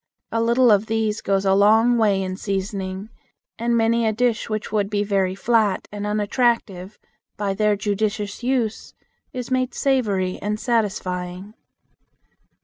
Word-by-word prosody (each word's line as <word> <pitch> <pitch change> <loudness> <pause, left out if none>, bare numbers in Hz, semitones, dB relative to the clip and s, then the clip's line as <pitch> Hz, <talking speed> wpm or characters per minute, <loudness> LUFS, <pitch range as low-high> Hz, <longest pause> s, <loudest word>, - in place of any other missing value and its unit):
A 230 - 0
little 235 +1 +4
of 205 +1 +3
these 220 -1 -1
goes 195 0 0
a 190 - +4
long 220 +4 +5
way 205 -4 +2
in 185 0 -4
seasoning, 195 0 -4 0.5
and 235 0 +1
many 230 0 +2
a - - +2
dish 230 +1 0
which 215 -2 -3
would 205 -2 0
be 205 -1 0
very 195 -2 0
flat 220 -1 +1
and 205 0 -4
unattractive, 210 -2 0 0.4
by 200 -1 -1
their 210 +1 +2
judicious 205 +1 -2
use 240 -3 -2 0.4
is 250 0 -6
made 255 0 0
savory 205 -9 0
and 210 +1 -2
satisfying. 190 -4 -2
210 Hz, 140 wpm, -22 LUFS, 195-230 Hz, 0.5 s, long